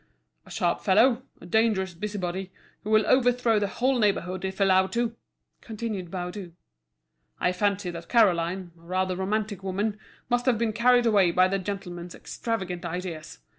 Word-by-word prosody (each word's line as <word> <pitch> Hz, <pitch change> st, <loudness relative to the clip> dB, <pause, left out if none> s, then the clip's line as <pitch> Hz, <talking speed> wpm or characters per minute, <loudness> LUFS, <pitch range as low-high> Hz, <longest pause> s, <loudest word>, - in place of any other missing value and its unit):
"A -, -, -13 dB
sharp -, -, 0 dB
fellow, 235 Hz, +5 st, +4 dB, 0.2 s
a -, -, -12 dB
dangerous 190 Hz, -1 st, +1 dB
busybody, 190 Hz, -1 st, -4 dB, 0.3 s
who 210 Hz, -, -5 dB
will 215 Hz, 0 st, +4 dB
overthrow 245 Hz, -3 st, +3 dB
the 205 Hz, -, 0 dB
whole 255 Hz, +5 st, 0 dB
neighbourhood 185 Hz, -3 st, 0 dB
if 190 Hz, +1 st, -4 dB
allowed 190 Hz, -1 st, +4 dB
to!" 235 Hz, -1 st, 0 dB, 0.5 s
continued 215 Hz, -5 st, -5 dB
Baudu. 180 Hz, 0 st, -6 dB, 0.9 s
"I 180 Hz, -, +2 dB
fancy 200 Hz, 0 st, 0 dB
that 170 Hz, 0 st, -9 dB
Caroline, 185 Hz, -5 st, +2 dB
a 165 Hz, -, -22 dB
rather 185 Hz, +2 st, -1 dB
romantic 205 Hz, +2 st, -2 dB
woman, 200 Hz, +3 st, -2 dB, 0.3 s
must 245 Hz, +1 st, 0 dB
have 245 Hz, -3 st, +4 dB
been 225 Hz, -1 st, 0 dB
carried 245 Hz, +2 st, +4 dB
away 205 Hz, -5 st, +4 dB
by 185 Hz, +2 st, +4 dB
the 195 Hz, +1 st, -1 dB
gentleman's 180 Hz, -3 st, -6 dB
extravagant 190 Hz, -6 st, -4 dB
ideas. 170 Hz, -, -6 dB
195 Hz, 155 wpm, -26 LUFS, 180-220 Hz, 0.9 s, fellow